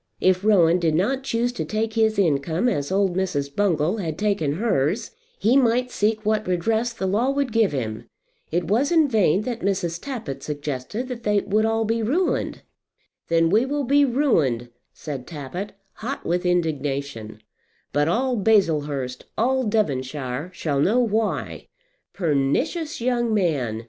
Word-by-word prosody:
If 185 0 +2
Rowan 180 -5 +4
did 160 -3 +1
not 255 +11 +1
choose 240 -1 0
to 245 - -4
take 220 +1 -2
his 220 -1 +2
income 160 - +1
as 145 - -1
old 190 -2 +1
Mrs. 145 -7 -2
Bungall 180 -2 +1
had 160 -6 -3
taken 200 -9 0
hers 190 - 0 0.3
he 225 +5 +2
might 250 -1 +3
seek 215 0 0
what 215 -1 +1
redress 220 +7 0
the 205 -5 -4
law 215 +7 +1
would 275 -2 0
give 225 -2 +3
him. 110 -6 -4 0.4
It 175 +2 +1
was 235 - +1
in 320 -3 +5
vain 210 - +2
that 235 0 -3
Mrs. 185 -4 -1
Tappitt 230 - -5
suggested 145 - -4
that 250 -2 -6
they 210 -2 +2
would 215 +2 +1
all 225 0 +1
be 225 +1 0
ruined. 305 +12 0 0.6
"Then 165 0 +2
we 220 +4 +4
will 285 +2 -1
be 285 +3 +4
ruined," 170 - +1 0.2
said 140 -5 -7
Tappitt, 170 +6 -6 0.2
hot 260 +5 -6
with 180 +1 0
indignation; 140 -10 -2 0.5
"but 145 +2 +2
all 250 +8 +1
Baslehurst, 150 -11 +1
all 260 +3 +2
Devonshire 140 - -1
shall 150 -6 -2
know 210 - +3
why." 225 -2 -1 0.5
Pernicious 195 - 0
young 240 -2 +1
man! 140 - 0
200 Hz, 155 wpm, -23 LUFS, 150-230 Hz, 0.6 s, in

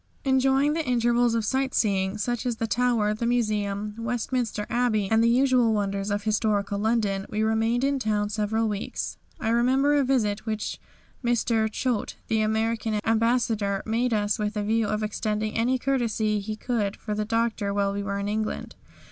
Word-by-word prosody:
Enjoying 270 +2 +3
the 325 0 -1
intervals 240 -2 +2
of 225 -2 0
sight 265 +3 0
seeing, 195 -2 +1
such 240 +3 -2
as 245 -2 -1
the 225 - -2
Tower, 225 -2 +1
the 235 +2 -2
Museum, 210 -3 -1
Westminster 235 -2 -2
Abbey, 235 -4 +1
and 225 +1 +4
the 230 - +4
usual 250 -2 +3
wonders 200 -1 -1
of 205 0 -1
historical 210 -2 0
London, 210 -3 0
we 215 +1 -1
remained 225 +3 +1
in 275 0 +1
town 210 -3 0
several 215 +2 0
weeks. 205 -1 -4 0.2
I 220 - -1
remember 260 +5 +3
a 290 -1 +3
visit 220 -6 0
which 215 -1 -3 0.4
Mr. 230 -2 +1
Choate, 245 -3 -2
the 220 -1 +2
American 220 0 0
Ambassador, 225 -3 +1
made 235 +3 0
us 205 -1 +1
with 210 0 -2
a 210 - 0
view 220 +1 +1
to 210 +1 -1
extending 215 0 -2
any 245 +3 +2
courtesy 230 -5 0
he 215 +2 -4
could 215 -3 -1
for 210 - -4
the 210 0 -1
Doctor 225 -2 0
while 200 0 0
we 200 - -2
were 200 0 -3
in 200 0 -3
England. 215 +1 -3
220 Hz, 175 wpm, -26 LUFS, 210-240 Hz, 0.4 s, and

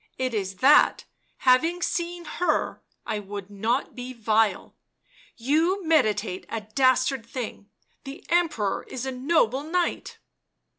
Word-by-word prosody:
"It 255 -1 -2
is 195 -3 -2
that, 280 +3 +5 0.3
having 325 +8 +3
seen 345 0 -2
her, 350 +3 -1 0.2
I 210 - -2
would 200 0 -8
not 225 +6 -1
be 250 0 -7
vile. 220 -2 0 0.6
You 325 +10 +1
meditate 215 - +1
a 225 - -3
dastard 255 +3 +2
thing 230 -3 -7 0.2
— - - -43
the 275 +1 -9
Emperor 315 - 0
is 255 0 -5
a 265 - -2
noble 260 -1 +1
knight." 340 +3 -2
255 Hz, 130 wpm, -25 LUFS, 220-315 Hz, 0.6 s, that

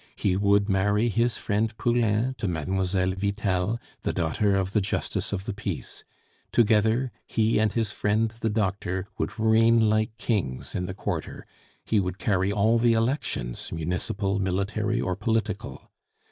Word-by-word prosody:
He 95 -2 +1
would 100 +1 +3
marry 105 +3 +2
his 115 +2 +1
friend 110 +2 -1
Poulain 120 +1 +1
to 105 - -1
Mlle. 95 +3 0
Vitel, 100 +2 -1 0.2
the - - -1
daughter 90 +4 +1
of 95 -1 0
the 105 - +3
justice 95 - -2
of 100 -1 -3
the 110 - -3
peace; 100 -5 -5 0.5
together, 115 +3 +3 0.2
he 110 0 +2
and 110 -1 +2
his 110 -2 -1
friend 110 +2 0
the 115 - 0
doctor 95 -3 -1
would - - -2
reign 110 0 +4
like 110 +1 0
kings 95 - -2
in 90 - -2
the 95 - -5
quarter; 95 -6 -4 0.4
he 110 - +2
would 90 -1 -2
carry 95 -1 +1
all 110 +3 +3
the 120 0 +4
elections 115 - -1
municipal, 90 +5 -2
military, 100 +4 -1
or 90 - -1
political. 105 0 -2
105 Hz, 150 wpm, -26 LUFS, 95-110 Hz, 0.5 s, reign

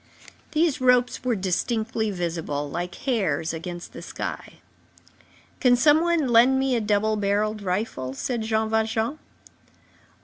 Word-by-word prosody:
These 310 -4 +1
ropes 250 -1 +3
were 250 -2 +1
distinctly 220 +4 -1
visible, 165 -6 -3
like 175 +4 -4
hairs, 185 - -1
against 175 +1 -7
the - - -8
sky. - - -6 1.1
"Can 250 -2 +5
some 295 +5 +5
one 340 -4 +1
lend 240 +3 +5
me 265 -1 +1
a 235 - 0
double 210 +1 +1
barrelled 210 +1 0
rifle?" 180 - -3
said 240 - -2
Jean 220 0 0
Valjean. 220 +5 0
220 Hz, 130 wpm, -24 LUFS, 185-250 Hz, 1.1 s, Can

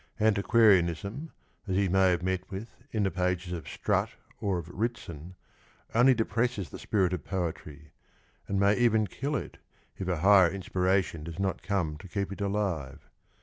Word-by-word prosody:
Antiquarianism, 105 - +3 0.4
as 95 - -1
he 100 0 +2
may 95 +1 +4
have 90 -1 0
met 95 0 -2
with 100 +4 -6 0.2
in 110 -2 0
the 95 - +1
pages 90 -1 -1
of 80 -5 -6
Strutt - - 0 0.3
or 100 -3 0
of 85 -2 -6
Ritson, 90 -5 -5 0.6
only 125 +3 +5
depresses 115 -2 -1
the - - -8
spirit 95 -4 +1
of 85 -5 -3
poetry, 80 -5 -5 0.6
and 100 - 0
may 100 +1 +4
even 110 -3 +3
kill 140 +10 -3
it - - -5 0.4
if 95 - -3
a 90 -2 0
higher 95 -2 +7
inspiration 95 -2 0
docs 85 +1 -7
not 95 -3 -1
come 90 -5 -1
to 95 - -11
keep 100 +1 -3
it 100 - -9
alive. 100 -9 -2
95 Hz, 165 wpm, -29 LUFS, 90-105 Hz, 0.6 s, higher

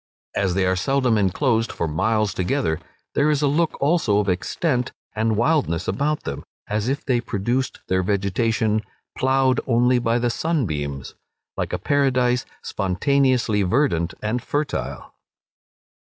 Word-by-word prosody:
As 95 -3 +1
they 95 -1 +2
are 95 0 +2
seldom 125 +5 +1
enclosed 110 +3 +1
for 85 - -2
miles 105 +6 +1
together, 85 -3 0 0.3
there 145 +2 +3
is 150 -1 +1
a - - +4
look 155 +3 +1
also 145 -8 +2
of 105 -1 +1
extent 125 - -1 0.2
and 110 0 +1
wildness 120 - +1
about 145 +9 0
them, 70 - -5 0.2
as 105 +3 -1
if 140 +2 -2
they 125 -3 +1
produced 120 +4 -2
their 95 0 +2
vegetation, 105 +3 +1 0.3
"ploughed 130 -1 +2
only 125 0 +3
by 115 0 +1
the 120 0 +1
sunbeams," 75 - -2 0.4
like - - -3
a - - -1
paradise 125 -3 +1 0.2
spontaneously 125 +2 +1
verdant 90 - +1
and 115 +3 -1
fertile. 145 +4 -3
115 Hz, 140 wpm, -22 LUFS, 100-135 Hz, 0.4 s, a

